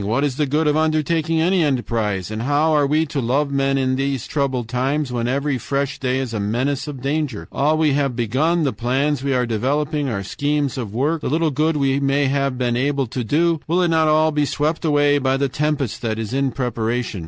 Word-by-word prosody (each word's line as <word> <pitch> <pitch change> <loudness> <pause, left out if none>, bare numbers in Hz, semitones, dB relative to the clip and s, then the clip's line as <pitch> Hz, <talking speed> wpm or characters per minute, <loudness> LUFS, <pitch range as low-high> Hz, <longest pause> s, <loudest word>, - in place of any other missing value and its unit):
What 110 +7 0
is 140 -3 -1
the 150 - +1
good 150 +4 +1
of 150 0 +2
undertaking 160 +1 +1
any 175 +2 +2
enterprise? 115 - -1
And 110 +1 -4
how 145 +5 +2
are 145 -2 +3
we 155 +3 +2
to 140 -2 -3
love 140 +4 0
men 135 0 +1
in 130 -1 +1
these 135 -2 -1
troubled 130 -5 -1
times 130 +3 -1
when 120 -1 -1
every 140 +1 -1
fresh 140 +3 -2
day 130 -1 0
is 130 -3 -3
a 110 - -2
menace 125 +8 -1
of 135 -4 -7
danger?... 140 -4 -2
All 150 +3 +1
we 155 -3 +2
have 140 -3 0
begun, 140 +9 +1
the 135 - 0
plans 135 +3 0
we 140 -1 0
are 125 -1 +1
developing, 140 +6 -1
our 100 -4 -3
schemes 145 +5 -1
of 120 -7 -5
work, 150 +6 0
the - - -2
little 160 +2 +1
good 155 +3 +1
we 135 -1 +1
may 140 +1 +1
have 140 -1 0
been 120 -1 0
able 135 +2 0
to 125 +1 -4
do, 165 +7 +1
will 175 +3 +2
it 175 - +2
not 160 -1 +3
all 155 +1 +3
be 150 -1 +1
swept 150 +4 -1
away 145 -2 +3
by 130 0 +1
the 140 0 +1
tempest 145 -3 -2
that 110 -2 -2
is 110 +1 -4
in 135 0 +1
preparation?... 120 -4 -2
140 Hz, 225 wpm, -20 LUFS, 125-150 Hz, -, are